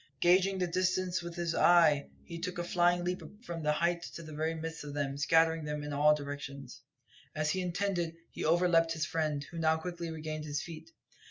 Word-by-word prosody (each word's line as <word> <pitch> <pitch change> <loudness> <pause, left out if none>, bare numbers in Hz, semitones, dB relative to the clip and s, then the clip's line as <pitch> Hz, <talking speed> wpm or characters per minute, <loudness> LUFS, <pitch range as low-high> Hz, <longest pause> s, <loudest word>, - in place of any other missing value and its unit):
Gauging 185 +2 +4
the 185 - +1
distance 185 +1 0
with 170 0 -7
his 170 -1 -1
eye, 165 -6 +5 0.2
he 170 -1 -7
took 180 +1 -4
a 175 - -1
flying 175 0 +2
leap 180 +1 -2 0.2
from 170 -1 -5
this 150 -1 +1
height 170 +1 +1
into 170 - -9
the 155 -1 -9
very 160 +2 -1
midst 165 0 -5
of 145 -1 -7
them, 140 -1 -1
scattering 160 +2 +3
them 150 0 -3
in 145 0 -4
all 150 +1 +5
directions. 140 -2 -7 0.5
As 155 0 +1
he 185 - -1
intended, 180 -2 -1 0.2
he - - -5
overleapt 165 0 +3
his 160 -1 -1
friend, 155 -3 -1
who 170 - -6
now 160 0 +3
quickly 170 0 -5
regained 155 -1 -5
his 145 -1 -2
feet. 165 - -9
165 Hz, 200 wpm, -32 LUFS, 150-175 Hz, 0.5 s, eye